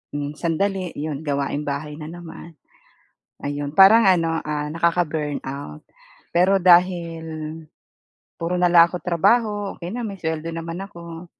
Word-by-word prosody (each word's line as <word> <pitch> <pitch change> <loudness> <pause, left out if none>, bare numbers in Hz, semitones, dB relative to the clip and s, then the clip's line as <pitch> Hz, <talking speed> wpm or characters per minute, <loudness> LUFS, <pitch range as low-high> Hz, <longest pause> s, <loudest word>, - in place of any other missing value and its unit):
hmm, 145 0 -3
sandali, 185 +2 -1
'yon, 150 0 -4
gawaing 140 0 -2
bahay 145 +1 -4
na 155 0 -8
naman, 170 -1 -10 0.9
ayun. 145 0 -3
Parang 205 +6 +7
ano, 165 -3 +3
ah, 150 -1 -3
nakaka-burnout. 155 -4 -2 0.6
Pero 190 +3 +4
dahil 175 -2 +3 1.2
puro 170 +2 -2
nalang 175 -1 +6
ako - - -2
trabaho, 205 +4 +1
okey 175 +1 -6
na, 245 - -3
may 200 - -5
suweldo 160 -1 -3
naman 165 +1 -5
ako, 170 -2 -10
165 Hz, 125 wpm, -22 LUFS, 150-180 Hz, 1.2 s, Parang